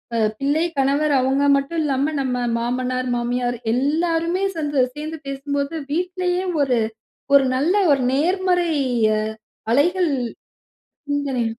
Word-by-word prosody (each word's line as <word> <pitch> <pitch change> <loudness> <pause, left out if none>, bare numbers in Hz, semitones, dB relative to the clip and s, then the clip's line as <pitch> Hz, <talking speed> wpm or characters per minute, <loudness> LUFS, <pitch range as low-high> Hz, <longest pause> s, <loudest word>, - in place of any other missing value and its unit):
அ - - +1 0.2
பிள்ளை, 290 +4 +1 0.2
கணவர் 285 +2 +2
அவுங்க 270 +2 +1
மட்டும் 280 +4 -2
இல்லாம, 280 +2 0
நம்ம 250 -2 -1
மாமனார், 255 +1 -2
மாமியார் 245 0 -1 0.2
எல்லாருமே 330 +6 0
சேந்து 290 -4 +1
சேந்து 310 +1 -6
பேசும்போது, 280 +2 -3 0.2
வீட்லயே 360 +1 -1 0.2
ஒரு 250 -4 +1 0.6
ஒரு 275 -1 +7
நல்ல 320 +9 +1 0.2
ஒரு 275 -2 +3
நேர்மறைய 335 -5 +1 0.8
அலைகள். 345 +5 +2 1.0
ம். 285 0 0
தனே 250 -4 -1
285 Hz, 115 wpm, -21 LUFS, 260-330 Hz, 1.0 s, ஒரு